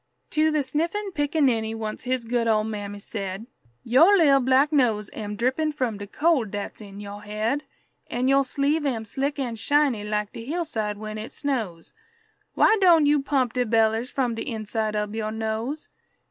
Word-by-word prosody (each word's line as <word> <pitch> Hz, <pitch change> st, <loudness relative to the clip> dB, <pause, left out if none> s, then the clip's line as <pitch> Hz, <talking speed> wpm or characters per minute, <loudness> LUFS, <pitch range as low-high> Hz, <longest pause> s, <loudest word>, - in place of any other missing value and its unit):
To 310 Hz, +1 st, +3 dB
the 305 Hz, -2 st, +1 dB
sniffing 340 Hz, +9 st, -2 dB
pickaninny 275 Hz, -8 st, +1 dB
once 220 Hz, +1 st, -5 dB
his 255 Hz, -1 st, -1 dB
good 235 Hz, 0 st, 0 dB
old 215 Hz, -1 st, +2 dB
mammy 205 Hz, -2 st, -5 dB
said, 200 Hz, 0 st, -5 dB, 0.4 s
"Yo' 250 Hz, +5 st, +3 dB
lil' 330 Hz, -8 st, +6 dB
black 265 Hz, +3 st, +3 dB
nose 225 Hz, -7 st, +2 dB
am 210 Hz, -1 st, -5 dB
drippin' 260 Hz, +8 st, 0 dB
from 245 Hz, -7 st, -2 dB
de 205 Hz, -, -7 dB
cold 295 Hz, -3 st, +1 dB
dat's 205 Hz, +2 st, -6 dB
in 200 Hz, -1 st, -10 dB
yo' 205 Hz, 0 st, -7 dB
head, 215 Hz, +7 st, -2 dB, 0.4 s
An' 245 Hz, +2 st, -1 dB
yo' 275 Hz, +1 st, +5 dB
sleeve 280 Hz, +3 st, 0 dB
am 230 Hz, -5 st, -2 dB
slick 275 Hz, +7 st, -2 dB
and 240 Hz, -5 st, -3 dB
shiny 280 Hz, -3 st, +2 dB
like 210 Hz, 0 st, -2 dB
de 230 Hz, -, -7 dB
hillside 235 Hz, -9 st, -2 dB
when 215 Hz, 0 st, -6 dB
it 215 Hz, -, -7 dB
snows. 225 Hz, -, -3 dB, 0.6 s
Why 440 Hz, -, +5 dB
doan' 335 Hz, -5 st, +6 dB
you 290 Hz, 0 st, +3 dB
pump 270 Hz, -4 st, 0 dB
de 250 Hz, -, +1 dB
bellers 225 Hz, +1 st, +2 dB
from 255 Hz, -4 st, -1 dB
de 225 Hz, -, -5 dB
inside 220 Hz, -2 st, -3 dB
ob 210 Hz, 0 st, -2 dB
yo' 220 Hz, -1 st, -2 dB
nose?" 220 Hz, +7 st, -3 dB
235 Hz, 175 wpm, -25 LUFS, 215-285 Hz, 0.6 s, lil